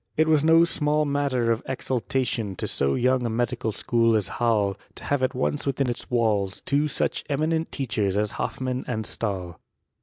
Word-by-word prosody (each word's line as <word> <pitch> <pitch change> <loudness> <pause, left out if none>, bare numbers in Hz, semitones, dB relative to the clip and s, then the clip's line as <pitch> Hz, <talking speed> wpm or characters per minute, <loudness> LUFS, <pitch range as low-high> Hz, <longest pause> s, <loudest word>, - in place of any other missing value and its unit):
It 155 +1 +4
was 155 -2 +4
no 165 +1 +6
small 150 -2 +1
matter 140 -5 +1
of 115 +1 0
exultation 125 -5 -2
to - - -4
so 70 0 0
young 130 +1 +2
a 120 - 0
medical 120 0 -1
school 115 0 +2
Halle, 105 0 0 0.2
to - - -10
have 145 -2 0
at 130 +1 0
once 140 +3 -1
within 135 -2 +1
its 120 - -7
walls 105 -5 0
two 145 +2 +2
such 145 - -1
en 140 - 0
nent 160 +1 0
teachers 110 -7 -1
as 105 0 0
Hoffmann 130 -1 -3
and 110 -3 -2
Stahl. 95 -7 -4
125 Hz, 180 wpm, -25 LUFS, 110-140 Hz, 0.2 s, no